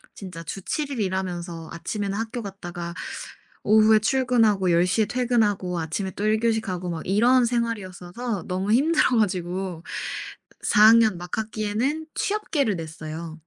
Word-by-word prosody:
진짜 180 -4 -8
주 195 +5 -6
7 295 - -2
일 265 - -4
일하면서 175 -3 -3
아침에는 200 +4 -3
학교 230 +2 -3
갔다가 175 -3 -6 0.7
오후에 215 +1 +6
출근하고 225 -6 +2
10:00 180 +6 +3
에 210 - +1
퇴근하고 210 -7 0
아침에 165 +5 -3
또 205 - -4
1 215 0 +2
교시 230 -1 +2
가고 180 -4 -4
막 165 -1 -4
이런 240 +6 +4
생활이었어서 225 -3 -3
너무 190 +3 -1
힘들어 290 +1 +3
가지고 185 -3 -1 0.8
4 210 - +3
학년 220 -5 +5
막 175 0 -5
학기에는 220 +8 -2
취업계를 300 - 0
냈어요. 160 0 -7
205 Hz, 305 characters per minute, -24 LUFS, 180-230 Hz, 0.8 s, 오후에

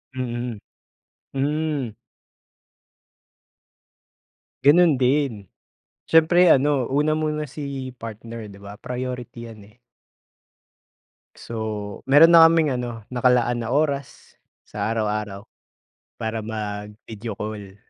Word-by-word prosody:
Mm. 120 -3 -4 0.7
Hmm. 145 -1 -1 2.7
Ganun 150 -2 +5
din. 125 -7 0 0.6
Siyempre 170 +3 +5
ano 135 -2 +2
una 145 +3 +1
mo 155 0 -1
na 150 0 -3
si 135 -2 -6
partner, 115 0 -8
'di 100 -1 -13
ba, 100 +1 -10
priority 125 -2 -6
'yan, 110 -2 -13
eh. 120 - -40 1.5
So, 110 -3 -6
meron 145 +5 +7
na 165 -1 +9
kaming 165 -2 +4
ano, 120 -2 -5
nakalaan 125 -1 +2
na 120 - -2
oras, 140 -2 -2 0.3
sa - - -3
araw-araw 105 -2 -2 0.7
para 110 0 -4
mag-video 105 0 -6
call. 105 -2 -7
125 Hz, 95 wpm, -23 LUFS, 110-145 Hz, 2.7 s, na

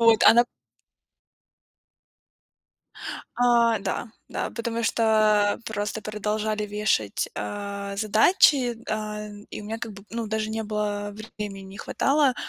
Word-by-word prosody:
Вот. 230 -2 +6
А - - +9
на 240 +1 +6 2.9
А, 235 -2 +4
да, 195 +4 -3 0.2
да. - - -2
Потому 230 0 -3
что, 230 - +1 0.5
а, - - -7
просто 210 0 -3
продолжали 215 0 -2
вешать, 205 - 0
а, 200 - -4
задачи, 240 - +4
э, 210 -1 -4
и - - -6
у - - -10
меня 220 +2 -4
как 225 - -5
бы, 195 0 -12
ну, 230 -1 -3
даже 220 0 -1
не 220 0 -2
было 205 -1 -2 0.3
времени, 200 -2 -5
не 195 +1 -11
хватало, 275 +3 +2
215 Hz, 130 wpm, -25 LUFS, 205-230 Hz, 2.9 s, А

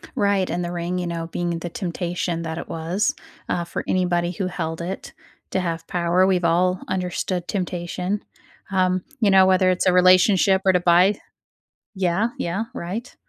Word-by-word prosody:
Right, 200 -2 +1
and 175 +2 -2
the 175 - -3
ring, 175 +1 -3
you 180 - -3
know, 165 -1 -4
being 170 0 -2
the 175 - -5
temptation 175 -1 -3
that 160 0 -4
it - - -6
was, 165 +5 -1 0.3
uh, 175 - 0
for 170 - -5
anybody 175 -1 +1
who 185 +1 -3
held 165 -2 -4
it 185 +3 -6 0.4
to 190 - 0
have 165 -2 -3
power; 175 +1 +2
we've 180 -2 +1
all 180 +2 +2
understood 180 -1 -2
temptation. 180 +1 -3 0.5
Um, 185 -1 +1 0.2
you 205 - +4
know, 190 -1 +7
whether 185 0 +4
it's 180 -1 +1
a 185 - +4
relationship 185 +1 +5
or 190 - +5
to 180 - +3
buy 180 +4 +4 0.8
Yeah, 190 +3 +1
yeah, 185 +6 -2
right. 200 +9 -5
180 Hz, 170 wpm, -22 LUFS, 170-185 Hz, 0.8 s, know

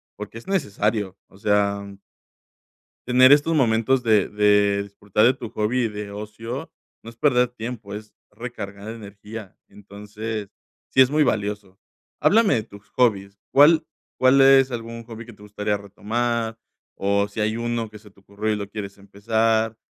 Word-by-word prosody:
porque 105 +2 -8
es 115 - -11
necesario. 105 - -1
O 95 - -20
sea, 100 -1 +1 1.2
tener 130 +2 +6
estos 150 +3 +3
momentos 125 -1 +2
de 110 -4 +3
de 105 -1 +3
disfrutar 100 +1 0
de 125 - +5
tu 120 -3 -8
hobby 110 +5 0
y - - +1
de 105 -1 -7
ocio, 115 +7 -7 0.3
no 115 - -9
es 115 - -14
perder 125 -3 +3
tiempo, 115 -3 -7
es 105 0 -9 0.2
recargar 105 -4 -8
energía. 105 -1 -10
Entonces 105 +1 -7 0.4
sí, - - +1
es 130 - +6
muy 150 +1 +3
valioso. 105 -5 -2 0.4
Háblame 220 -3 +4
de 110 - -1
tus 100 -1 -16
hobbies. 100 -5 0 0.2
¿Cuál 155 +3 +6 0.3
cuál 130 +1 +5
es 135 -1 +6
algún 115 -1 -6
hobby 115 0 -9
que 120 - -12
te 105 - -20
gustaría 105 0 -2
retomar 115 +3 -2 0.4
o 100 +1 +1
si 105 - -8
hay 110 +1 0
uno 115 -1 -2
que 105 - -12
se 105 0 -17
te 100 - -24
ocurrió 100 +2 -4
y - - +1
lo 100 -1 -5
quieres 100 -1 -7
empezar 110 +3 0
110 Hz, 165 wpm, -23 LUFS, 100-120 Hz, 1.2 s, tener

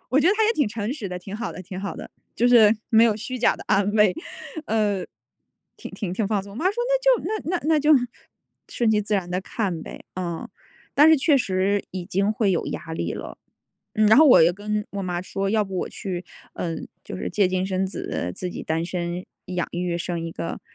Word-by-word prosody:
我 275 +4 +4
觉 335 - +4
得 400 - +4
她 440 +1 +3
也 450 - +3
挺 290 - +2
诚 215 +2 -3
实 220 -9 -5
的， 180 0 -5
挺 195 +3 -7
好 230 0 -4
的 185 - -8
挺 185 0 -8
好 200 - -4
的， - - -9 0.2
就 240 - +3
是 225 -3 +7 0.2
没 225 0 +6
有 220 -3 +3
虚 250 +4 -5
假 240 - +3
地 - - -9
安 200 0 +2
慰， 210 -4 +4 0.5
呃， 210 -4 +1 0.7
挺 - - -9
挺 190 -5 -4
挺 200 +2 -1
放 205 -1 0
松。 200 - -11
我 205 - -10
妈 330 - 0
说： 390 - +2
“那 - - +3 0.4
就 - - -8
那 360 - +1
那 - - -13
那 315 -2 +4
就 300 +2 +3 0.8
顺 235 -2 +1
其 215 -1 +3
自 210 +1 -1
然 185 -3 -1
地 180 +1 -1
看 190 -5 -3
呗。 - - -10
“嗯， 175 -3 -4 0.5
但 295 +3 +7
是 320 - +7
确 285 +1 +4
实 195 -3 +1
已 185 -1 -5
经 195 +4 +1
会 215 -2 +1
有 175 - 0
压 160 - -6
力 85 - -2
了。 - - -7 0.6
嗯， 215 0 +4
然 220 - +7
后 315 - +8
我 250 - +8
又 170 - +5
跟 210 +2 -3
我 200 -1 -4
妈 180 -1 -2
说 195 +1 -2
要 215 0 +2
不 195 -1 -6
我 - - -2
去， 180 -2 -5 0.3
嗯， 165 -2 -4 0.2
就 - - -6
是 - - -4
借 200 -3 +3
精 185 0 0
生 190 0 0
子 90 - -4
自 180 - -4
己 - - -6
单 160 +1 -1
身 175 0 -3 0.2
养 180 -1 -2
育 175 0 -1
生 170 0 -3
一 165 - -4
个。 85 -1 -5
200 Hz, 250 characters per minute, -24 LUFS, 180-220 Hz, 0.8 s, 后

